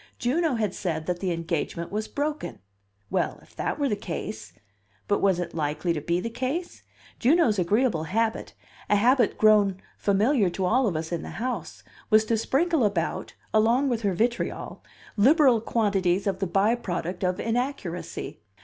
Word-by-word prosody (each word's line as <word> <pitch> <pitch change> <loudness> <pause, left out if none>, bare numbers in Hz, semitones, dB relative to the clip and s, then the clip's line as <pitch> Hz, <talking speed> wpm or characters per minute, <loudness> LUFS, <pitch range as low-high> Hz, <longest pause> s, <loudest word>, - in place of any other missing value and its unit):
Juno 300 +3 +1
had 210 -4 -1
said 160 -4 -3
that 180 0 -2
the 185 -1 -1
engagement 170 0 -3
was 215 +1 -2
broken. 295 +1 -3 0.5
Well, 185 -1 0
if - - -22
that - - -2
were 285 -2 +1
the 210 - 0
case 110 - -6 0.6
But 205 - +1
was 195 -3 +3
it 170 -1 -4
likely 155 +2 -1
to 155 - -3
be 170 +3 0
the 205 - -3
case? 275 +9 -3 0.4
Juno's 250 - +3
agreeable 190 -2 +1
habit, 225 +5 -1 0.3
a 210 - +4
habit 245 +5 +3
grown 205 -3 +4 0.2
familiar 205 +1 +2
to 185 +2 -2
all 250 +6 +3
of 185 - -1
us 160 +2 -3
in 170 - -2
the - - -7
house, 225 -9 -4 0.3
was 215 0 +5
to 225 0 +1
sprinkle 315 +4 +1
about, 195 -6 -1 0.2
along 235 +6 +3
with 235 -2 -1
her 200 -4 0
vitriol, 235 +5 -2 0.3
liberal 260 0 +5
quantities 200 -5 +1
of 195 -2 -1
the 195 - -1
by 195 +6 +3
product 180 -5 -4
of 180 0 0
inaccuracy. 225 - -3
205 Hz, 165 wpm, -26 LUFS, 175-240 Hz, 0.6 s, was